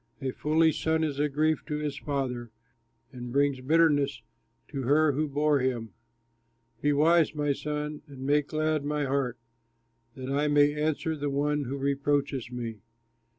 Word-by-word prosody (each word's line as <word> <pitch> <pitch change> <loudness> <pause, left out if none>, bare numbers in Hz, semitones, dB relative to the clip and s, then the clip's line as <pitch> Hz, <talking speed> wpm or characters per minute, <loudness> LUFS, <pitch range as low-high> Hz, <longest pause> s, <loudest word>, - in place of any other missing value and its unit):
A 135 -1 -2
foolish 160 +3 +1
son 160 0 +2
is 145 -3 -2
a 150 0 +2
grief 155 +2 +1
to 150 - -2
his 150 -2 -3
father, 130 -5 -3 0.6
And 125 -2 -7
brings 140 -1 +1
bitterness 145 -1 +2 0.5
to 140 -3 -4
her 145 +4 +3
who 150 +3 -1
bore 145 +1 +2
him. 120 -5 -2 0.9
Be 145 - +2
wise, 155 +2 +3
my 145 -1 +1
son, 150 +1 -4
and 140 -2 -11
make 145 +1 +2
glad 155 -1 0
my 150 0 -1
heart, 130 -3 -1 0.8
That 130 0 -5
I 145 +2 +1
may 145 0 +4
answer 155 +1 -1
the 145 -1 -2
one 145 +1 0
who 135 +3 -4
reproaches 140 -2 0
me. 115 -3 -5
145 Hz, 155 wpm, -28 LUFS, 135-150 Hz, 0.9 s, may